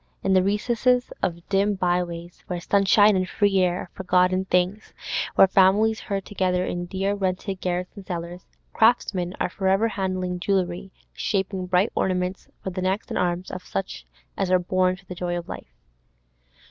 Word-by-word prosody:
In 195 - +2
the 185 - +5
recesses 235 +5 +1
of 170 -1 -2
dim 200 +1 +2
byways, 175 -2 -2
where 180 -1 -3
sunshine 200 +3 +4
and 185 0 0
free 200 -2 +2
air 180 -1 +1
are 180 - -9
forgotten 185 0 +2
things, 185 +3 0 0.4
where - - +8
families 200 +4 +4
herd 195 -1 -4
together 185 -2 0
in 175 -1 -3
dear 195 +2 -1
rented 190 -1 -2
garrets 180 0 -2
and 200 - -9
cellars, 175 0 -6 0.3
craftsmen 190 -6 +2
are - - +1
for 190 - -3
ever 195 +4 +3
handling 185 -3 -2
jewellery, 185 0 -1 0.2
shaping 190 -2 -2
bright 180 +4 +2
ornaments 185 0 -1 0.2
for 190 - -3
the 185 +1 -4
necks 190 +3 -1
and - - -2
arms 180 0 -1
of 185 0 -6
such 80 -10 -5 0.3
as 195 - 0
are 185 - +5
born 185 +1 +1
to 185 +1 -19
the 180 - -7
joy 175 0 -3
of 170 - -6
life. - - -8
185 Hz, 170 wpm, -24 LUFS, 180-195 Hz, 0.4 s, where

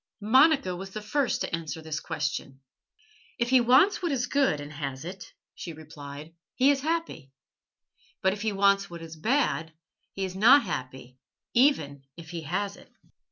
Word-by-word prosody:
Monica 265 - +4
was 190 +2 -7
the 215 - -6
first 265 +5 0
to - - -1
answer 165 -1 -6
this 155 -1 -4
question. 135 -1 -4 0.8
"If 235 +1 -1
he 260 -1 +6
wants 260 +14 +4
what 345 -3 -1
is 250 -3 0
good 265 - +1
and 145 +1 -8
has 140 -1 -5
it," 190 +2 -8 0.2
she 170 - -7
replied, 150 0 -10 0.2
"he 265 +2 +5
is 275 -1 0
happy. 320 - -3 0.9
But 190 0 +3
if 205 - -7
he 220 0 0
wants 200 0 +2
what 170 -1 -9
is 165 -1 -9
bad, 165 - 0 0.4
he 195 - -2
is 185 -1 -6
not 245 +9 +7
happy 130 0 -6 0.3
even 235 - +2 0.2
if 165 -1 -10
he 170 -1 -5
has 195 +6 -3
it." - - -18
190 Hz, 170 wpm, -27 LUFS, 155-250 Hz, 0.9 s, not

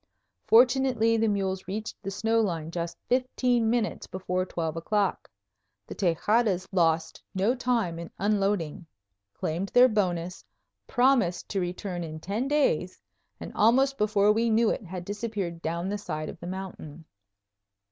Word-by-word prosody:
Fortunately 245 -1 +4
the 225 0 +2
mules 190 -3 -1
reached 215 +3 -5
the 195 - -4
snow 225 +3 +1
line 165 -6 -2
just 170 0 -4
fifteen 250 -2 +1
minutes 230 -2 -1
before 185 0 -2
twelve 165 -3 -3
o'clock. 200 +4 -1 0.6
The - - -8
Tejadas 190 +2 +1
lost 165 -3 +1
no 200 +6 +2
time 235 -9 -1
in 170 - -7
unloading, 195 -6 0 0.5
claimed 175 +5 -2
their 250 +1 +7
bonus, 180 -5 -1 0.4
promised 245 -9 +2
to 195 - -1
return 180 0 -4
in 155 -1 -6
ten 205 +10 -2
days, 270 - +1 0.4
and - - -7
almost 265 +5 +4
before 210 -1 +3
we 230 +2 +2
knew 225 0 +3
it - - -2
had 180 -1 -7
disappeared 205 -5 -4
down 170 +2 -2
the 205 +1 -2
side 155 -5 -4
of - - -9
the 175 - -8
mountain. 175 -4 -7
195 Hz, 145 wpm, -27 LUFS, 175-225 Hz, 0.6 s, their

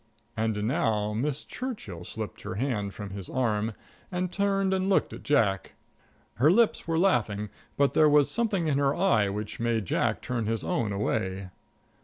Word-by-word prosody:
And 110 -2 -1
now 110 -4 +1
Miss 135 +6 -1
Churchill 205 - -6
slipped 110 +2 -6
her - - -5
hand 105 -4 -1
from 100 -1 -7
his 95 -2 -7
arm 110 -3 0 0.4
and 180 0 -2
turned 195 -1 +1
and 190 0 0
looked 195 - +2
at - - -8
Jack. 105 -10 +1 0.6
Her 135 +6 +5
lips 220 +2 +3
were 165 -1 +1
laughing, 105 - +1 0.3
but 140 -1 +3
there 155 -1 +5
was 145 -1 +4
something 210 -8 0
in 140 -2 +2
her 140 0 +2
eye 120 - +3
which 105 +1 -5
made 115 -3 0
Jack - - 0
turn 120 -4 -2
his 115 -1 -1
own 110 -3 0
away. 95 -2 -2
120 Hz, 170 wpm, -28 LUFS, 105-165 Hz, 0.6 s, Her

